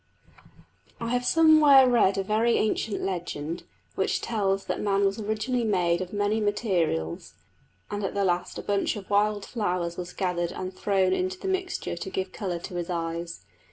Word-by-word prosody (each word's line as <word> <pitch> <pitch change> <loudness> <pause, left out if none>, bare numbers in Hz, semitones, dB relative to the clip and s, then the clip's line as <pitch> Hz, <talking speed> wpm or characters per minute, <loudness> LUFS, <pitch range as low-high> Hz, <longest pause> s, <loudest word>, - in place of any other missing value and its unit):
I 230 - -3
have 245 +1 0
somewhere 310 -5 +7
read 230 -6 +3
a 195 - 0
very 220 +4 +2
ancient 215 0 -1
legend, 170 -3 -4 0.3
which - - 0
tells 195 -3 -1
that - - -3
man 200 -1 +2
was 195 +2 0
originally 220 +4 -1
made 180 -5 +1
of 185 0 -5
many 205 +1 0
materials, 180 - -1 0.6
and 205 - -3
that 195 - 0
at - - -7
the 200 -1 +1
last 175 -1 -1
a - - -5
bunch 200 +2 0
of 205 -2 -9
wild 205 0 +2
flowers 180 -6 -2
was 180 0 -5
gathered 175 -3 -1
and 185 0 -5
thrown 190 -1 +1
into 370 0 -1
the 390 - -6
mixture 380 - -2
to 175 - -6
give 190 0 -3
colour 185 -5 -3
to 175 +1 -7
his 175 0 -4
eyes. 170 0 -4
195 Hz, 180 wpm, -26 LUFS, 180-220 Hz, 0.6 s, somewhere